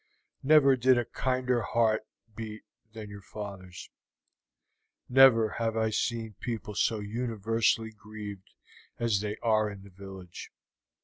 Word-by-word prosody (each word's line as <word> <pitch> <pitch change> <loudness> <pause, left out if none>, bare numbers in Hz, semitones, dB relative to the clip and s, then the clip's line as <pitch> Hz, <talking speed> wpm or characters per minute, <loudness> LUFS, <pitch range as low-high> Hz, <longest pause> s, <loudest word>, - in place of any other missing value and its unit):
Never 140 -1 +6
did 130 0 +4
a 120 - 0
kinder 125 0 0
heart 110 0 +1 0.3
beat 110 -1 -7 0.3
than 110 -2 -9
your 100 -1 -9
father's; 95 -3 -9 1.2
never 125 -4 +7
have 115 -1 -1
I 110 0 +1
seen 115 0 -2
people 115 -3 -4
so 110 +2 +1
universally 110 +1 0
grieved 105 -2 -10 0.4
as 115 -4 +1
they 105 0 -3
are 110 -2 +3
in 100 -1 -10
the 100 - -14
village. 95 -2 -10
110 Hz, 125 wpm, -29 LUFS, 105-120 Hz, 1.2 s, never